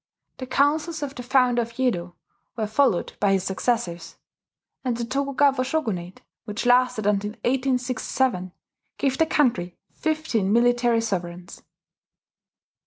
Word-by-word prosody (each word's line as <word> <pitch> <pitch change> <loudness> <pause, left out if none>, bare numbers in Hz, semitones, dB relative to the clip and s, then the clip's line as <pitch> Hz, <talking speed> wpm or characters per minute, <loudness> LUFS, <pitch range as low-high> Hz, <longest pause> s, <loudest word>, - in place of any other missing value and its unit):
The 255 - -5
counsels 300 +4 +1
of 280 -1 -4
the 250 - -7
founder 245 -1 +3
of 230 0 -6
Yedo 185 -9 -1 0.4
were 220 - 0
followed 215 -3 +1
by 200 -1 +3
his 190 -1 +1
successors; 190 -3 -2 0.7
and 245 -3 -1
the 235 - -2
Tokugawa 275 +1 +1
shogunate, 220 - -3 0.2
which 215 +2 -4
lasted 250 -3 +3
until 205 0 +1
1867, 250 -5 0 0.5
gave 270 -1 0
the 320 - +4
country 210 - +1
fifteen 310 -11 -1
military 240 0 +3
sovereigns. 180 -4 -4
245 Hz, 120 wpm, -24 LUFS, 200-265 Hz, 0.7 s, the